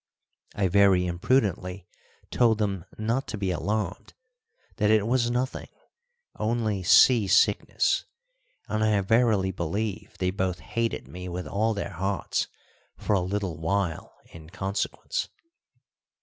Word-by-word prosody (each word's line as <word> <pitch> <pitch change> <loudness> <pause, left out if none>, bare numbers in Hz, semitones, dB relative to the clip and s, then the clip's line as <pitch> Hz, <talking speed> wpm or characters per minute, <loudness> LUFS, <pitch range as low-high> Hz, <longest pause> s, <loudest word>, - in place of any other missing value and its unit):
I 100 -2 +1
very 95 -1 +4
imprudently 90 -1 0 0.4
told 115 -3 +3
them 100 -5 -2
not 115 +5 -1
to 110 - -4
be 95 -2 -1
alarmed, 105 0 -3 0.6
that 105 -2 +2
it 110 -1 +4
was 120 0 +1
nothing 125 +2 -2 0.7
only 110 -3 0
sea 110 +4 +6
sickness - - +2 0.6
and 110 0 -1
I 105 -2 +3
verily 105 -2 +2
believe 100 +4 -4
they 90 0 0
both 95 -2 -1
hated 115 +4 -3
me 90 +1 -7
with 90 +1 -5
all 110 +2 0
their 100 - -4
hearts 95 +2 -2 0.5
for - - -1
a 95 - +3
little 95 -3 -3
while 85 0 -1 0.2
in 80 -1 -12
consequence. 100 - -3
100 Hz, 125 wpm, -26 LUFS, 90-110 Hz, 0.7 s, sea